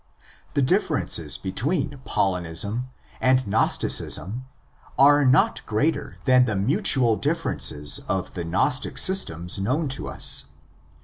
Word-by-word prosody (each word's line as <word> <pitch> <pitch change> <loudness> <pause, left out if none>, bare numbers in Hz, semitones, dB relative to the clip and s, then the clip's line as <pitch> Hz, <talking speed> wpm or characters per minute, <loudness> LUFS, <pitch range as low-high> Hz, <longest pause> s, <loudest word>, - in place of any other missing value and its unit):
The 140 - +2
differences 130 - 0
between 135 - -2
Paulinism 95 +6 -1 0.3
and 130 0 +2
Gnosticism 105 +3 0 0.5
are 145 +1 +5
not 130 +1 +2
greater 145 +7 -2
than 130 -1 +4
the 110 -4 -2
mutual 125 - +2
differences 140 - -1
of 95 -2 -3
the 90 - -5
Gnostic 130 - -1
systems 90 - +1
known 130 +11 -1
to 135 - -3
us. 70 - +3
125 Hz, 110 wpm, -23 LUFS, 95-140 Hz, 0.5 s, are